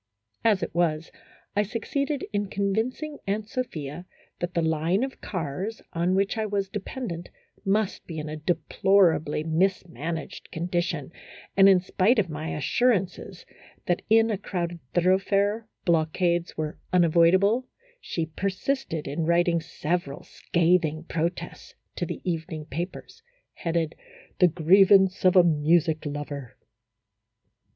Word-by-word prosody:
As 215 -4 +3
it - - -4
was, 165 -2 0 0.4
I 205 - +4
succeeded 270 +7 -2
in 205 -1 -1
con 200 0 0
vincing 255 +8 -2
Aunt 210 +2 -1
Sophia 175 - -5 0.3
that 175 0 -4
the 170 - +2
line 160 +6 +1
of 265 0 -5
cars 185 +5 -4
on 175 +2 +1
which 195 +3 +1
I 220 - 0
was 200 -1 -1
dependent 200 -4 -5 0.3
must 200 +1 0
be 165 - -6
in 155 0 -4
a 155 - -4
deplorably 160 -1 +2
misman 170 -1 -1
aged 145 - -11
condition, 170 -3 -2 0.4
and, 195 0 +7
in 190 -2 +6
spite 190 +6 +2
of 185 -6 +1
my 155 +1 -4
assurances 190 - 0 0.4
that 175 - 0
in 225 +1 +5
a 205 - -2
crowded 175 -4 -3 0.2
thoroughfare 195 +4 +2 0.2
blockades 170 +1 +1
were 155 -1 -3
unavoidable, 180 +7 +4 0.3
she 170 - -3
persisted 190 - -2
in 155 +4 -2
writing 170 0 +3
several 160 -2 -3
scathing 170 -2 +1
protests 170 +1 -4 0.2
to - - -2
the - - -5
evening 160 -2 -3
papers, 175 - -6 0.3
headed: 165 -2 -1 0.2
" - - -25
The 180 - +7
Grievance 190 +3 +5
of 185 - +5
a 180 - +8
Music 160 0 +2
Lover. 145 -3 -6
175 Hz, 130 wpm, -26 LUFS, 160-200 Hz, 0.4 s, a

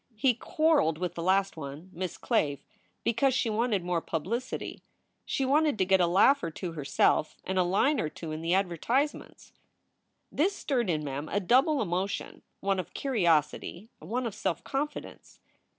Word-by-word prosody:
He 250 +4 +3
quarreled 295 - +2
with 180 +1 -3
the 170 - -5
last 195 +3 +2
one, 155 +4 -8
Miss 180 0 -4
Clave, 145 -2 0 0.4
because 250 +3 +2
she 235 -3 +1
wanted 215 -3 +1
more 175 -1 0
publicity. 220 +13 -4 0.4
She 270 - -1
wanted 295 -1 +3
to 190 - +2
get 190 0 +4
a 175 - +4
laugh 200 +11 +5
or 165 - -2
two 170 +2 -5
herself 155 0 +1
and 190 0 -1
a - - +5
line 205 +12 +2
or 155 - -1
two 160 +1 -8
in 155 +1 -4
the 170 +2 +1
advertise 200 - +1
ments." - - -14 0.8
This 380 +7 +1
stirred 245 - -1
in 155 -3 0
Mem 145 +1 -4
a 205 - +1
double 260 - +3
emotion 185 +1 -3 0.2
one 195 -1 +1
of 180 - -6
curiosity, 175 - 0
one 240 +10 -3
of 225 - -3
self 170 -2 -2
confidence. 295 +2 -5
190 Hz, 170 wpm, -29 LUFS, 165-250 Hz, 0.8 s, laugh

